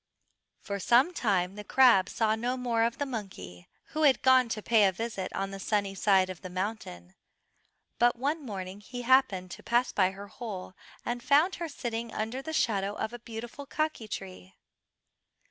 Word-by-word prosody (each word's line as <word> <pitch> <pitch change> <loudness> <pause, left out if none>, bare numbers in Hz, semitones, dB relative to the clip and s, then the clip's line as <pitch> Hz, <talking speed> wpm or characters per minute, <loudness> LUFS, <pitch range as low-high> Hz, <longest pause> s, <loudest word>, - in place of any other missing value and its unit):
For 200 0 -4
some 250 - +4
time 190 - 0
the 210 +1 -8
crab 230 -5 +5
saw 220 -1 +1
no 240 +3 -1
more 240 -2 0
of 235 - -2
the 285 - -1
monkey, 95 - -7 0.2
who 310 - -3
had 285 -3 +4
gone 260 -2 +5
to 215 -1 -3
pay 220 -3 +4
a - - +2
visit 205 -1 -4
on 195 0 -3
the 195 - -7
sunny 200 -1 0
side 195 -1 +3
of 185 -2 -8
the 185 - -7
mountain; 180 - -5 0.9
but 240 0 +4
one 290 +6 -2
morning 195 -4 -6
he 245 +3 -7
happened 235 -8 +3
to - - -8
pass 240 +1 +1
by 185 -2 +3
her 195 +1 -9
hole, 200 -5 -7 0.3
and 240 0 -2
found 295 +8 +3
her 335 -1 -4
sitting 235 -4 -4
under 225 +5 -3
the 315 - -6
shadow 200 -9 0
of 220 +2 -3
a 240 - -7
beautiful 235 +5 -8
kaki 310 -7 -2
tree. 95 - -8
225 Hz, 180 wpm, -29 LUFS, 195-250 Hz, 0.9 s, crab